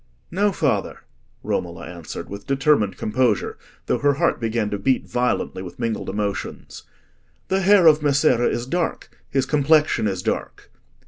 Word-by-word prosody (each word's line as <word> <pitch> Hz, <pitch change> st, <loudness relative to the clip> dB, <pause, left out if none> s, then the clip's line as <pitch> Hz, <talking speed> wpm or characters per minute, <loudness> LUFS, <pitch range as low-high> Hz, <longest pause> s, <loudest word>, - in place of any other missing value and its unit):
"No, 200 Hz, +4 st, +2 dB
father," -, -, -1 dB, 0.4 s
Romola -, -, -3 dB
answered, 85 Hz, -3 st, -8 dB
with 100 Hz, 0 st, -9 dB
determined 135 Hz, -7 st, +2 dB
composure, 115 Hz, -1 st, 0 dB, 0.3 s
though -, -, 0 dB
her 145 Hz, -1 st, +2 dB
heart 170 Hz, +4 st, +1 dB
began 115 Hz, -2 st, -1 dB
to 100 Hz, -, -2 dB
beat 130 Hz, +5 st, +1 dB
violently 125 Hz, -5 st, -1 dB
with 90 Hz, -2 st, -9 dB
mingled 115 Hz, -4 st, -3 dB
emotions. 100 Hz, 0 st, -4 dB, 0.6 s
"The 190 Hz, +1 st, +1 dB
hair 195 Hz, -1 st, +5 dB
of 155 Hz, -1 st, +6 dB
Messere 140 Hz, -4 st, +3 dB
is 120 Hz, -, -2 dB
dark—his 140 Hz, -3 st, -3 dB
complexion 150 Hz, -5 st, +3 dB
is 95 Hz, -3 st, -3 dB
dark." -, -, -4 dB
130 Hz, 140 wpm, -22 LUFS, 105-150 Hz, 0.6 s, of